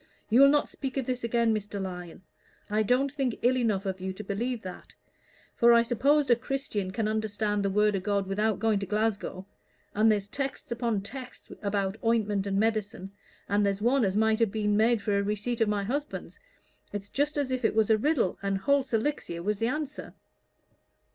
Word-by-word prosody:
You'll 270 +5 +7
not 295 +1 +3
speak 270 -1 -5
of 265 - -1
this 250 -1 -3
again, 235 -1 +2
Mr. 205 -1 -4
Lyon 180 -2 -7 0.5
I 215 +1 +2
don't 255 +5 +1
think 270 -5 -1
ill 250 +2 +4
enough 215 -6 0
of 190 -1 -3
you 190 0 -3
to 210 - -8
believe 225 +4 -3
that. 185 -1 -9 0.6
For 235 0 +6
I 235 0 +6
suppose 275 +5 +2
a 240 - +5
Christian 235 -6 -3
can 210 +3 -1
understand 215 -1 -1
the 200 - +1
word 210 +1 +2
o' - - 0
God 200 +1 0
without 210 +2 0
going 220 -2 +1
to 195 - -5
Glasgow, 210 -2 -1 0.5
and 220 +2 +4
there's 205 -2 0
texts 275 +3 -4
upon 235 -3 -1
texts 255 +4 -9
about 200 0 -2
ointment 210 -3 +1
and 195 0 0
medicine, 210 -3 -1 0.4
and 205 +1 +2
there's 200 -1 0
one 245 +4 +2
as 195 0 +1
might 220 0 +3
have 225 -4 +2
been 210 -1 0 0.2
for 205 -1 0
a - - +2
receipt 210 +4 -2
of 220 - +3
my 205 -1 0
husband's 285 - -4 0.5
it's 205 -1 -5
just 290 +2 -1
as 280 -3 0
if 255 -1 -2
it 220 - +1
was 220 0 +3
a 220 - +5
riddle, 280 - +1
and 195 -1 0
Holt's 270 +3 +1
Elixir 220 - -2
was 210 +1 -1
the 225 - +1
answer." 300 +2 -4
215 Hz, 195 wpm, -28 LUFS, 200-245 Hz, 0.6 s, You'll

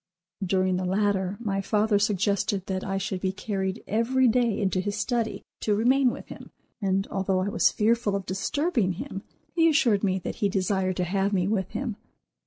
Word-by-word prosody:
During 185 0 +1
the 185 - -2
latter, 195 0 0
my 200 -4 -1
father 210 +1 +2
suggested 200 -1 0
that 190 -1 -3
I 195 -1 -2
should 195 -1 -3
be 190 - 0
carried 190 0 -3
every 250 +4 +2
day 235 -2 +2
into 190 -2 +1
his 205 +2 -2
study 225 -5 -1 0.2
to 210 - +1
remain 255 +4 +4
with - - -7
him, - - -10 0.3
and, 195 0 +1
although 195 -1 0
I 195 - -1
was 220 - +3
fearful 220 -1 +1
of 195 -2 -3
disturbing 210 - 0
him, 195 +2 -6 0.3
he 330 -1 +4
assured 235 -10 +3
me 190 -2 +2
that 185 - -5
he 205 - +1
desired 190 -1 0
to 180 - +1
have 195 +3 0
me 185 -2 +1
with 195 -3 0
him. 240 -6 -3
200 Hz, 190 wpm, -26 LUFS, 190-220 Hz, 0.3 s, remain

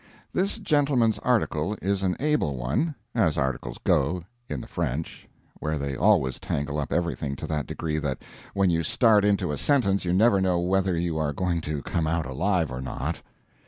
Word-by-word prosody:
This 195 +4 +1
gentleman's 140 - +2
article 105 -6 0
is 100 0 0
an 95 -2 0
able 150 - +1
one 75 - -1 0.2
(as 100 -10 +2
articles 65 -3 -2
go, 85 +6 +2 0.3
in 75 - -3
the - - -8
French, 75 +6 -4 0.3
where 75 0 -1
they 70 -1 -3
always 80 - +3
tangle 75 +1 -2
up 70 - -3
everything 85 -5 -1
to - - -6
that 75 -2 -2
degree 75 -2 -2
that 70 -4 -3 0.3
when 100 -2 +3
you 85 0 +1
start 105 +5 +4
into 100 -6 +2
a 75 - -3
sentence 115 -9 +2
you 90 - -1
never 100 +2 +4
know 90 -2 +2
whether 95 0 +1
you 85 -2 -1
are 75 -2 0
going 85 +2 -1
to 75 -2 -4
come 80 -2 -1
out 80 0 0
alive 80 +4 0
or 65 0 -4
not). 70 +5 -4
85 Hz, 185 wpm, -26 LUFS, 75-100 Hz, 0.3 s, start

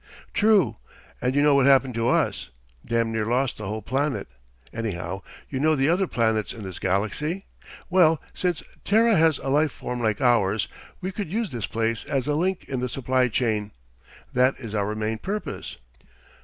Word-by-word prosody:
"True. 200 - +3 0.4
And 125 +2 0
you 145 - +4
know 150 -1 +5
what 140 -1 +4
happened 135 -2 +5
to 115 +1 +1
us? 65 - +1 0.3
Damned 115 -1 0
near 110 -1 -1
lost 125 +1 0
the 105 - -5
whole 110 +1 -4
planet. 135 +5 -1 0.5
Anyhow, 95 -4 -4 0.3
you 130 - -4
know 155 +2 +3
the 135 +1 +2
other 185 +3 +2
planets 110 -4 0
in 110 - -9
this 95 -2 -7
galaxy? 110 - -1 0.4
Well, 165 -4 +4
since 180 -3 -1 0.2
Terra 225 +2 +4
has 160 -3 +4
a 135 - -5
life 150 +2 +3
form 125 0 -5
like 110 -3 +1
ours, 110 -5 +2 0.3
we 185 +1 -3
could 195 -4 -5
use 220 -3 -1
this 120 -5 -3
place 115 0 -1
as 135 -3 -1
a 150 - 0
link 180 +4 -1
in 130 -2 -2
the 125 0 -2
supply 130 0 +1
chain. 110 -3 -1 0.6
That 130 +1 +3
is 115 -5 -7
our 105 0 -1
main 110 +1 -2
purpose. 210 - -5
125 Hz, 180 wpm, -25 LUFS, 110-155 Hz, 0.6 s, know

